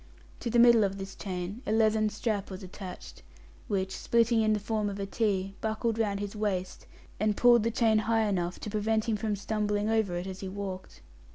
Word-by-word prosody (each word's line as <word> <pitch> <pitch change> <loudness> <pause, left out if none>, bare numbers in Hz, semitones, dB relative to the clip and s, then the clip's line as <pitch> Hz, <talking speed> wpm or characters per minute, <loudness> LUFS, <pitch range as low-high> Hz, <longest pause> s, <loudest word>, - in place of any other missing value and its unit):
To 240 - -3
the 240 - +1
middle 235 -2 +7
of 195 -1 -1
this 195 0 -6
chain 185 +3 -5
a - - 0
leathern 220 -1 +3
strap 210 -2 -2
was 190 0 -7
attached, 180 - -9 0.5
which, 190 -2 -1
splitting 230 -1 +2
in 215 0 +3
the 210 - 0
form 210 0 -1
of 200 0 -6
a 200 - -2
T, 195 -2 -1
buckled 220 +1 -1
round 205 -3 0
his 205 +1 -5
waist, 195 -4 -3 0.3
and 215 0 +1
pulled 240 -1 +6
the 230 - +1
chain 225 -1 +3
high 225 +1 +1
enough 180 -3 -1
to 210 - -5
prevent 220 +1 0
him 225 - +1
from 210 0 -1
stumbling 210 0 -1
over 220 -5 +1
it 175 +1 -3
as 190 0 -6
he 190 - -5
walked. 190 -1 -7
210 Hz, 205 wpm, -29 LUFS, 195-220 Hz, 0.5 s, middle